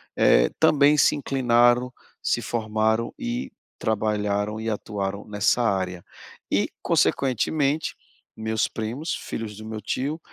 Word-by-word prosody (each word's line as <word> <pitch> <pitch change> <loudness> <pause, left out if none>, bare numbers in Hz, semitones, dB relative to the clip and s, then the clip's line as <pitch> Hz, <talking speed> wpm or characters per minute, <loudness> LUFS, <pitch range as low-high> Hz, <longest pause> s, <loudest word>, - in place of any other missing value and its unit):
eh, - - +4
também 150 0 +5
se - - +4
inclinaram, 125 -2 +3 0.3
se - - 0
formaram 110 0 0
e 245 +1 -4 0.3
trabalharam 105 -1 -1
e 115 - -2
atuaram 100 -1 -3
nessa 105 +3 +1
área. 95 -4 -1 0.5
E, - - +2
consequentemente, 140 +4 +1 0.4
meus 110 0 0
primos, 120 +9 -4
filhos 110 -2 -6
do 110 - -9
meu 110 -1 -5
tio, 140 +9 -2
110 Hz, 115 wpm, -24 LUFS, 105-130 Hz, 0.5 s, também